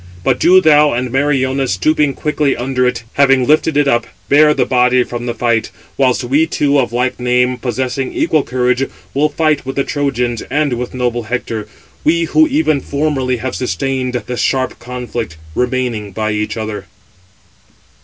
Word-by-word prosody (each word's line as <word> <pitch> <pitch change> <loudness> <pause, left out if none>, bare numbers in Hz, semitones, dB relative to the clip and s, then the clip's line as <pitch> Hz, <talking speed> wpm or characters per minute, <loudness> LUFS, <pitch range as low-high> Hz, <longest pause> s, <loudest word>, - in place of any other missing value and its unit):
But - - +1
do 185 +2 +6
thou, 150 -2 +5
and 125 +1 -2
Meriones, 135 -3 +1
stooping 150 - +1
quickly 150 -2 0
under 125 0 0
it, 120 -1 -2
having 135 -2 +3
lifted 155 +1 +2
it 145 -1 +3
up, 120 -2 +1 0.2
bear 150 +1 +6
the - - +1
body 125 0 +3
from 120 0 -6
the 120 - -1
fight; 115 -1 0 0.3
whilst 130 -1 +1
we 145 +6 +2
two 145 -2 +1
of 125 - 0
like 125 +1 -1
name, 125 +1 +1
possessing 130 +2 -3
equal 155 - +1
courage, 125 0 0 0.2
will 150 +3 +2
fight 155 0 0
with 135 +1 -5
the 140 - +1
Trojans 125 -6 -1
and 145 -2 0
with 125 +1 -4
noble 120 -1 -1
Hector, 115 -3 -3 0.4
we 170 +2 +2
who 315 - +3
even 270 - +1
formerly 140 -3 -1
have 130 +2 -4
sustained 125 +2 -2
the 125 - -5
sharp 130 +4 -1
conflict, 120 -7 -5 0.2
remaining 125 -4 -2
by 110 +1 -2
each 105 +2 -2
other." 110 -1 -5
130 Hz, 165 wpm, -15 LUFS, 120-145 Hz, 0.4 s, do